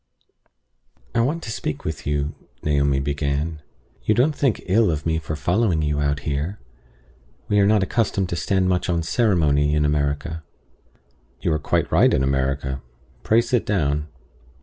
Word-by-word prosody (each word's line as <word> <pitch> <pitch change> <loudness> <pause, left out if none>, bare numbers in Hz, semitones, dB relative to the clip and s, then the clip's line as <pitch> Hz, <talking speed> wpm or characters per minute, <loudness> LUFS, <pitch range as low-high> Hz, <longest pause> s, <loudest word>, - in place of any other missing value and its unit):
"I - - +1
WANT 150 +8 -1
to 110 - -5
speak 75 -8 -4
to 75 -2 -4
you," 75 0 -1 0.3
Naomi 70 -2 +2
began 70 +2 -2 0.4
"You 110 - +2
don't 145 +5 +2
think 135 -7 0
ill 105 +3 +3
of 75 -2 -2
me 80 0 +1
for 75 0 -4
following 85 +2 +1
you 75 -1 0
out 70 0 0
here? 75 +7 -2 0.9
We 105 - +3
are 100 - +4
not 105 -2 +4
accustomed 100 -3 0
to - - -2
stand 95 +2 +1
much 90 0 0
on 85 -1 +1
ceremony 80 - +2
in 75 -1 +2
America." 75 +2 -1 1.0
"You 80 - +1
are 75 - 0
quite - - 0
right - - +5
in 65 - +2
America. 65 0 -1 0.4
Pray 110 - +4
sit 120 -1 0
down." 75 -6 0
80 Hz, 160 wpm, -22 LUFS, 70-100 Hz, 1.0 s, right